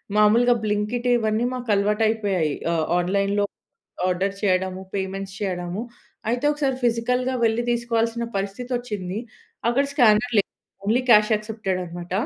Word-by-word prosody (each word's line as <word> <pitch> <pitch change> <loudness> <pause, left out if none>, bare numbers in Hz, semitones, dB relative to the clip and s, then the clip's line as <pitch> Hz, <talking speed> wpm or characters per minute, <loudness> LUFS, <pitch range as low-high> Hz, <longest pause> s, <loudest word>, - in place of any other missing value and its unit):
మాములుగా 230 +4 +5
బ్లింకిట్ 210 +4 -1
ఇవన్నీ 220 +1 0
మాకు 250 -2 -6
అలవాటు 210 +2 +1
అయిపోయాయి. 195 -9 0 0.2
ఆహ్, 160 -1 +1
ఆన్‌లైన్‌లో 200 +3 +1 0.6
ఆర్డర్ 190 +2 0
చేయడము, 185 -1 +1
పేమెంట్స్ 195 0 -3
చేయడము. 180 +1 -3 0.5
అయితే 245 +3 -1
ఒకసారి 275 -3 -1
ఫిజికల్‌గా 250 +2 +1
వెళ్లి 230 +1 +1
తీసుకోవాల్సిన 235 0 0
పరిస్థితొచ్సింది. 210 -1 -3 0.5
అక్కడ 270 +4 +3
స్కానర్ 240 -3 +4
లేదు 195 - +1 0.4
ఓన్లీ 235 +5 +2
క్యాష్ 210 0 +6
యాక్సెప్టెడ్ 210 -3 -2
అన్నమాట.. 175 +1 -8
210 Hz, 120 wpm, -23 LUFS, 195-240 Hz, 0.6 s, క్యాష్